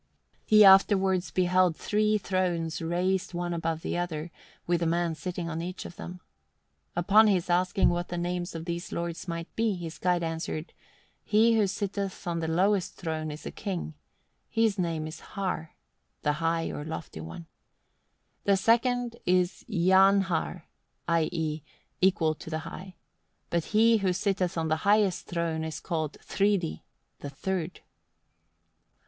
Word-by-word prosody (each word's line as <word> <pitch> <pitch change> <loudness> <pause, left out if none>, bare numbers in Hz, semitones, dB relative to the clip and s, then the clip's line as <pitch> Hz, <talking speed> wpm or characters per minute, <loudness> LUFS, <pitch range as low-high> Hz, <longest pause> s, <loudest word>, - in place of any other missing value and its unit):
He 215 -1 +8
afterwards 190 -2 +5
beheld 180 +1 +2
three 215 0 +1
thrones 180 -5 -1
raised 180 +2 -1
one 175 0 -2
above 165 -1 -2
another, 170 -2 -3 0.3
with 175 0 +1
a 170 - +1
man 170 0 +1
sitting 170 +3 -5
on 165 0 -3
each 180 +2 -6
of 175 - -9
them. 180 +1 -8 0.7
Upon 210 +6 +5
his 180 -4 +1
asking 185 +2 +3
what 175 0 -1
the 175 - -4
names 175 0 -3
of 165 0 -5
these 170 +1 -4
lords 170 +1 -4
might 170 0 -5
be, 225 -3 +1
his 170 -2 -7
guide 175 -1 +1
answered: 165 0 -4 0.5
"He 225 +2 +4
who 215 -2 +3
sitteth 200 0 -3
on 170 -1 -1
the 160 - -2
lowest 185 +3 +1
throne 160 -3 -3
is 150 +1 -8
a - - -4
king; 180 -5 -4 0.6
his 225 -3 +1
name 165 -3 -1
is 155 +1 -7
Har 185 -6 -4 0.5
(the 150 - +2
High 165 0 0
or 145 - -5
Lofty 155 - -6
One); 80 - -8 1.0
the 200 -1 +4
second 235 +3 +2
is 180 +1 +2
Jafnhar 190 -2 +3 0.5
(i.e. 160 -2 0 0.4
equal 175 -4 +3
to 155 - -10
the 160 -1 -2
High); 180 +2 -9 0.6
but 170 -2 0
he 225 +1 +4
who 190 -3 +1
sitteth 185 -2 -1
on 160 -1 0
the 155 0 +1
highest 200 0 +2
throne 165 -2 -2
is 160 -1 -4
called 160 -4 -2
Thridi 195 - 0 0.4
(the 145 - -6
Third)." 180 +4 -3
175 Hz, 150 wpm, -28 LUFS, 165-195 Hz, 1.0 s, He